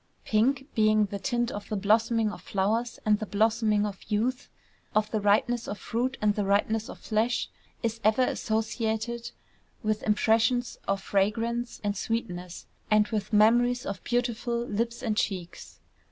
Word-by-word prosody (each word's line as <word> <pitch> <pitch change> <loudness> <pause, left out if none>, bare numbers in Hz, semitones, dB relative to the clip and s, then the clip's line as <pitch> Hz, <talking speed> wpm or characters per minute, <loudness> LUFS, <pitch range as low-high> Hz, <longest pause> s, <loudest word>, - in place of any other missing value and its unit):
Pink, 250 +5 +2
being 215 -1 +4
the 200 0 -5
tint 240 +3 0
of 205 - -7
the 215 - -1
blossoming 220 +2 +2
of - - -9
flowers 220 +5 -1
and 210 -1 +3
the 215 - -4
blossoming 215 0 +2
of 200 -2 -5
youth, 235 +5 -1 0.5
of 215 0 +2
the 215 - 0
ripeness 220 +4 +2
of 205 - -4
fruit 250 +5 -2
and 210 -1 +4
the 205 - -1
ripeness 210 +3 +1
of - - -8
flesh, 225 +2 0 0.3
is 230 0 -1
ever 220 +4 +4
associated 225 +1 -1 0.5
with 215 0 0
impressions 225 +3 +2
of 195 -1 0
fragrance 225 +4 0
and 205 -1 0
sweetness, 180 -5 -4 0.2
and 210 -1 +4
with 210 -1 -2
memories 240 +3 +4
of 195 - -5
beautiful 240 -1 -1
lips 230 +2 -2
and 215 -2 -1
cheeks. 180 -5 -3
220 Hz, 155 wpm, -28 LUFS, 210-235 Hz, 0.5 s, being